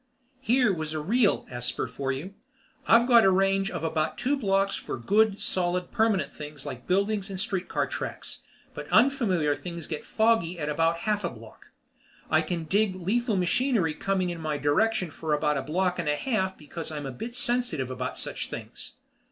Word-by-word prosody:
Here 245 -4 +3
was 155 -2 -4
a 155 - -2
real 205 +7 +2
esper 125 0 -2
for 135 -1 -3
you. 155 +9 -5 0.5
I've 235 +1 +6
got 235 -3 +7
a 195 - +6
range 195 +1 +2
of - - -5
about 155 -1 -1
two 275 +3 +1
blocks 195 -6 +1
for - - -5
good, 205 - +2
solid, 180 0 -1
permanent 220 -4 +1
things 150 -2 -9
like 125 -1 -7
buildings 200 +2 +1
and 190 -1 -5
street 190 -1 0
car - - +1
tracks, - - -6 0.3
but - - -7
unfamiliar 195 - +3
things 170 -1 -7
get 155 -3 -5
foggy 220 -6 +2
at 150 -2 -3
about 165 +2 +2
a - - -9
half 210 0 0
a 175 - 0
block. 115 -2 -14 0.6
I 155 - +5
can 165 +1 -3
dig 195 +4 +1
lethal 210 +5 0
machinery 185 - +1
coming 185 +2 -1
in 170 -1 -6
my 155 -2 -1
direction 170 +5 +1
for 155 0 -1
about 150 0 +1
a - - -2
block 180 +6 0
and - - -1
a 150 - +2
half 190 - -1
because 160 +2 -7
I'm 150 -2 -5
a 135 - -4
bit 230 - -7
sensitive 240 - +1
about 125 0 -4
such - - -3
things. - - -7
180 Hz, 190 wpm, -27 LUFS, 155-215 Hz, 0.6 s, got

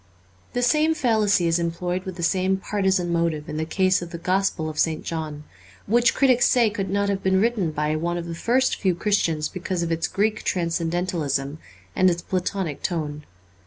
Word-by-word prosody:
The 245 - 0
same 305 +6 +3
fallacy 215 - +2
is 165 +1 +2
employed 175 +2 -2
with 185 -2 -5
the 175 - -5
same 190 +2 +1
partisan 190 -3 0
motive 165 -3 0
in 150 - -5
the 160 - -1
case 185 +2 +2
of 175 - -6
the 170 - -6
Gospel 185 -2 0
of 155 -1 -5
St. 160 -1 +1
John; 155 -2 -5 0.4
which 240 +3 +3
critics 255 -3 +4
say 235 -4 +3
could 195 -2 -3
not 200 +1 0
have 200 -1 -1
been 190 0 +2
written 215 -5 +1
by 150 0 -1
one 170 +2 -1
of 170 - -4
the 170 - -5
first 250 +9 +1
few 185 -3 +1
Christians 170 -6 0
because 185 -1 -3
of 170 - -2
its 165 0 0
Greek 215 +2 0
transcendentalism 165 -4 -1 0.4
and 185 0 +4
its 170 -1 -2
Platonic 185 -4 -2
tone. 150 -4 -3
180 Hz, 190 wpm, -24 LUFS, 165-200 Hz, 0.4 s, critics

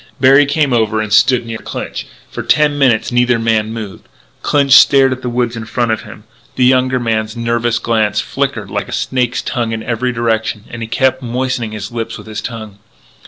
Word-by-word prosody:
Berry 135 +2 +5
came 145 -2 +1
over 110 -2 +1
and 110 -1 -2
stood 125 +2 +4
near 115 -1 -6
Clinch. - - -6 0.2
For - - -5
ten 150 -1 +2
minutes 130 -5 +2
neither 120 0 +2
man 110 -1 0
moved. 110 -4 -8 0.3
Clinch 140 -2 +1
stared 135 0 +7
at 130 0 -4
the 125 - -3
woods 120 -1 -1
in 115 0 -6
front 115 +1 -1
of 110 -1 -1
him. 105 0 -12 0.3
The 125 - +2
younger 130 0 +3
man's 110 -1 -2
nervous 115 0 0
glance 110 -3 0
flickered - - -3
like - - -3
a - - -6
snake's 125 -2 -1
tongue 115 -2 -2
in 110 0 -4
every 125 +2 -1
direction, 110 -3 -1
and 115 - -7
he 115 - -4
kept 130 +2 +1
moistening 125 -2 -2
his 105 - -6
lips 115 -1 -4
with - - -12
his 110 -1 -6
tongue. 110 -4 -8
120 Hz, 200 wpm, -15 LUFS, 110-130 Hz, 0.3 s, stared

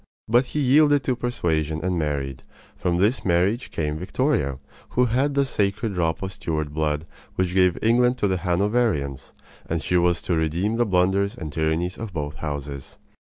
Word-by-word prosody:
But 120 +4 +4
he 150 - -3
yielded 145 +1 +4
to 125 0 0
persuasion 80 -11 -1
and 90 -2 0
married. 70 -4 -2 0.3
From 85 -1 0
this 105 +8 +2
marriage 95 +7 +1
came 75 -1 -2
Victoria, 90 - 0 0.4
who 125 - +5
had 135 +5 +1
the 140 0 +3
sacred 105 -2 -1
drop 85 -1 -1
of 95 0 -4
Stuart 75 -4 -3
blood 75 0 -1 0.3
which 90 -1 0
gave 90 -2 +3
England 125 +2 +3
to 105 - +1
the 95 -1 0
Hanoverians; 90 - 0 0.4
and 85 - 0
she 90 +3 +1
was 85 0 +2
to 90 - -1
redeem 85 +8 0
the 120 -1 +2
blunders 95 +2 +2
and 75 -4 -7
tyrannies 80 +3 -1
of 115 -4 -6
both 75 -3 -4
houses. 70 -2 -6
90 Hz, 170 wpm, -24 LUFS, 80-115 Hz, 0.4 s, who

